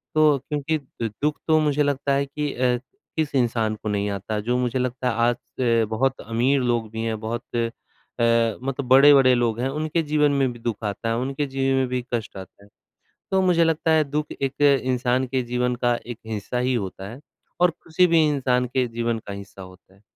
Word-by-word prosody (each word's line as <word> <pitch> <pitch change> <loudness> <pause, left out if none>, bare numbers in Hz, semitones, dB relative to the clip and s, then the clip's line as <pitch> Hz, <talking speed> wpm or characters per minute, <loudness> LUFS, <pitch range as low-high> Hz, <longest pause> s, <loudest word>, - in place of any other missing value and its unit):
तो 155 -2 +5
क्योंकि 150 +1 -1
द 130 -5 -6
दुःख 150 +1 0
तो 155 0 +4
मुझे 150 -1 +2
लगता 140 -1 0
है 140 +1 +1
कि 145 +1 -3
अ, 125 0 +1 0.4
किस 155 -2 -1
इंसान 115 -3 +1
को 105 - -6
नहीं 105 0 -1
आता, 100 +2 -3
जो 120 +4 -1
मुझे 125 0 -1
लगता 125 0 -1
है - - -1
आज 120 +1 +1 0.2
अ, 115 -2 +3
बहुत 130 +4 0
अमीर 125 +5 +1
लोग 120 -3 0
भी 110 - -4
हैं, 110 -1 -2
बहुत 115 +2 -4
अ, 115 -1 +1 0.9
मतलब 135 -1 -3
बड़े-बड़े 135 0 +7
लोग 115 -2 0
हैं 130 +2 0
उनके 155 +3 -1
जीवन 150 -1 +2
में 135 -2 +1
भी 120 - -13
दुःख 115 -1 -4
आता 105 +2 -3
है, 115 - +1
उनके 135 +3 -2
जीवन 135 0 0
में 130 -1 +1
भी 125 0 -2
कष्ट 110 -4 -3
आता 95 +1 -12
है। 100 - -19 0.6
तो 190 - +3
मुझे 175 -2 +3
लगता 165 0 +1
है 155 -1 +4
दुःख 150 +2 -3
एक 135 +1 -2 0.2
इंसान 130 0 +1
के 130 0 -1
जीवन 125 +1 -1
का 120 0 +4
एक 120 -2 -7
हिस्सा 110 +2 -4
ही 130 - +1
होता 95 -3 -4
है 125 - -10 0.4
और 180 - +5
किसी 165 +2 +1
भी 165 -2 +4
इंसान 125 -3 +1
के 130 -1 +2
जीवन 115 0 -2
का 100 - -5
हिस्सा 100 -1 -9
होता 95 0 -15
है। 100 - -25
125 Hz, 210 wpm, -23 LUFS, 115-140 Hz, 0.9 s, बड़े-बड़े